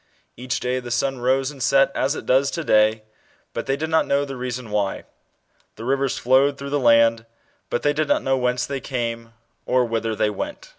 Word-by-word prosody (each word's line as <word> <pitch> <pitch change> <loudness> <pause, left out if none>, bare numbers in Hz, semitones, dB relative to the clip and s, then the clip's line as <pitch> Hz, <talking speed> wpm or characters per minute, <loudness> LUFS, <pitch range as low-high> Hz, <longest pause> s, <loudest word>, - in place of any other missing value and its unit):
Each 125 +2 -3
day 125 +1 -1
the 125 -1 -8
sun 135 +2 -1
rose 130 +3 +1
and 140 -3 -12
set 135 +1 +3
as 135 +3 0
it - - -7
does 135 +2 +3
to 165 +2 -4
day, 110 -3 +3 0.5
but - - -4
they 135 +1 0
did 160 +2 -4
not 160 - +3
know 140 +1 +1
the 135 -1 -7
reason 125 -2 -5
why: 105 -2 -1 0.7
the 115 - -8
rivers 135 +1 0
flowed 135 +3 +3
through 140 0 -7
the 145 - +1
land, 115 -2 +4 0.4
but 120 - -2
they 145 - +2
did 155 +1 -1
not - - +1
know 135 0 +2
whence 125 -1 0
they 140 -1 -4
came, 115 -3 -4 0.3
or 125 -1 +3
whither 115 -1 -2
they 105 - +1
went. 100 - -6
130 Hz, 210 wpm, -22 LUFS, 115-140 Hz, 0.7 s, land